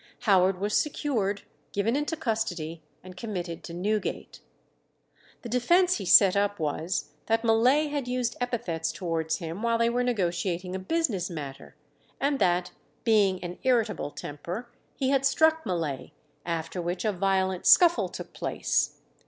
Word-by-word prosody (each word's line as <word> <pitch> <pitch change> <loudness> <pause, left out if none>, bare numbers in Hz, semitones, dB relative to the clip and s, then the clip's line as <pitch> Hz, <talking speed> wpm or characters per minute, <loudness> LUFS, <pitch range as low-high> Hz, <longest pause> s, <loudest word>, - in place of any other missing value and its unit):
Howard 190 -3 +3
was 205 +2 -1
secured, 230 -10 0 0.3
given 210 +5 +1
into 295 +3 -1
custody, 185 - -2 0.2
and 185 0 -11
committed 180 -5 -5
to - - -8
Newgate. 205 +5 -3 1.0
The 240 - -6
defence 350 +10 +3
he 200 - -6
set 190 +1 +7
up 205 0 +1
was, 155 +1 -2 0.2
that 225 +1 +1
Mullay 250 +7 +3
had 285 -4 -2
used 250 -2 -1
epithets 200 -10 -2
towards 165 -3 -2
him 170 +3 -6
while 230 0 +1
they 230 0 +2
were 245 +1 0
negotiating 180 -5 -1
a - - -3
business 205 - -1
matter, 140 -5 -8 0.4
and 280 0 0
that, 180 -1 +1 0.3
being 200 -5 +3
an 175 0 -6
irritable 240 - +1
temper, 170 +12 -7 0.3
he 265 - 0
had 275 -1 +2
struck 315 +3 +3
Mullay, 155 -6 -3 0.3
after 165 +1 -3
which 175 +4 -3
a 215 - +2
violent 190 -1 0
scuffle 345 -1 +6
took - - -9
place. - - -1
200 Hz, 145 wpm, -27 LUFS, 175-245 Hz, 1.0 s, set